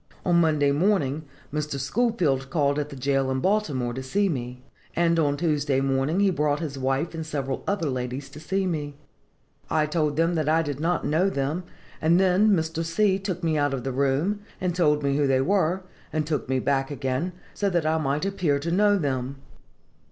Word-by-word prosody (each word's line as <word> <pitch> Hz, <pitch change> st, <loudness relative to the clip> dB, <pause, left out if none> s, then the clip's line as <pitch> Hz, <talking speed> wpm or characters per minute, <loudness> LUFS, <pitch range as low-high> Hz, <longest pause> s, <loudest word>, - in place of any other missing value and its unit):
"On 170 Hz, -1 st, +4 dB
Monday 150 Hz, -3 st, +3 dB
morning, 155 Hz, -3 st, +1 dB, 0.3 s
Mr. 150 Hz, -2 st, -2 dB
Schoolfield 150 Hz, -, 0 dB
called 145 Hz, -1 st, +1 dB
at 145 Hz, 0 st, -3 dB
the 140 Hz, -, -8 dB
jail 135 Hz, 0 st, 0 dB
in 130 Hz, 0 st, 0 dB
Baltimore 145 Hz, -, 0 dB
to 130 Hz, -, -4 dB
see 195 Hz, +10 st, +1 dB
me; 125 Hz, -4 st, -4 dB, 0.3 s
and 170 Hz, -1 st, +3 dB
on 145 Hz, -2 st, +2 dB
Tuesday 145 Hz, -4 st, +1 dB
morning 135 Hz, +6 st, +1 dB
he 200 Hz, -1 st, +4 dB
brought 150 Hz, -3 st, +1 dB
his 155 Hz, -4 st, -4 dB
wife 135 Hz, +5 st, -1 dB
and 165 Hz, -1 st, -4 dB
several 140 Hz, -4 st, -3 dB
other 200 Hz, -6 st, 0 dB
ladies 130 Hz, +1 st, -3 dB
to 150 Hz, -, -10 dB
see 190 Hz, +5 st, -1 dB
me. 150 Hz, -5 st, -3 dB, 0.7 s
I 155 Hz, -1 st, +2 dB
told 150 Hz, -1 st, 0 dB
them 165 Hz, +2 st, +2 dB
I 155 Hz, +2 st, +2 dB
did 145 Hz, -2 st, -4 dB
not 170 Hz, +3 st, 0 dB
know 170 Hz, +6 st, +2 dB
them, 150 Hz, +3 st, -2 dB, 0.4 s
and 165 Hz, +3 st, +4 dB
then 190 Hz, +3 st, +4 dB
Mr. 165 Hz, -4 st, +1 dB
C. 190 Hz, +4 st, +2 dB
took 185 Hz, -3 st, -4 dB
me 160 Hz, -2 st, +1 dB
out 145 Hz, -1 st, +1 dB
of 125 Hz, -, -5 dB
the 135 Hz, -, -2 dB
room, 140 Hz, +10 st, +1 dB, 0.2 s
and 180 Hz, -2 st, -1 dB
told 150 Hz, -4 st, +2 dB
me 140 Hz, 0 st, +1 dB
who 145 Hz, -1 st, +2 dB
they 135 Hz, -1 st, +3 dB
were, 185 Hz, +3 st, +1 dB, 0.3 s
and 155 Hz, 0 st, -1 dB
took 150 Hz, -3 st, -2 dB
me 130 Hz, -, +2 dB
back 135 Hz, +1 st, 0 dB
again, 140 Hz, +4 st, -2 dB, 0.2 s
so 200 Hz, -, 0 dB
that 170 Hz, -4 st, 0 dB
I 160 Hz, +1 st, +2 dB
might 145 Hz, +3 st, -1 dB
appear 180 Hz, -7 st, +1 dB
to 160 Hz, +4 st, -3 dB
know 205 Hz, +3 st, +4 dB
them. 135 Hz, -5 st, -2 dB
150 Hz, 195 wpm, -25 LUFS, 135-175 Hz, 0.7 s, On